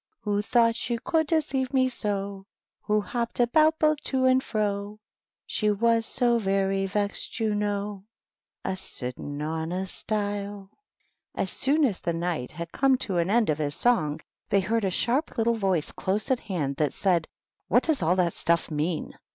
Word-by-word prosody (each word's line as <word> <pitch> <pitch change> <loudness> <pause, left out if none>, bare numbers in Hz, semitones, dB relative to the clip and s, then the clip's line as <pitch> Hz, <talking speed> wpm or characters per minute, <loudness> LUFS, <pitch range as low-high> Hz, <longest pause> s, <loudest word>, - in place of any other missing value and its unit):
Who 205 -1 0
thought 230 +1 +3
she 235 0 -1
could 315 +6 0
deceive 275 -5 0
me 260 -1 +4
so; 200 -4 -3 0.4
Who 210 0 +2
hopped 235 +5 -3
about 310 +6 +4
both 305 -1 +2
to 260 -1 +1
and 260 0 +5
fro, 210 -2 -2 0.2
— - - -68
She 215 - 0
was 230 +2 +2
so 240 -2 +2
very 195 -1 +1
vexed, 205 +4 -2
you 220 -2 +1
know, 205 -1 -2 0.6
A 190 - -1
sitting 145 -4 -6
on 160 +1 -3
a 185 +1 -2
stile.'' 205 0 -3 0.6
As 190 - -1
soon 290 +3 +2
as 210 -8 -1
the 170 - -1
Knight 165 -6 -2
had 170 +1 -7
come 270 -1 +3
to 230 -7 -4
the 170 0 +1
end 225 -6 +3
of 150 - -2
his 145 -1 -1
song, 155 -11 +1 0.3
they 195 - +3
heard 220 +2 0
a - - +2
sharp 245 - 0
little 230 +1 +3
voice 190 -8 0
close 210 +7 -2
at 255 - +2
hand 145 -8 -3
that 150 -3 +1
said, 175 -5 +1 0.2
" - - -55
What 245 +6 +4
does 315 -4 +1
all 170 +2 +3
that 175 -3 +1
stuff 170 0 +1
mean 155 +2 -2
205 Hz, 180 wpm, -26 LUFS, 180-235 Hz, 0.6 s, and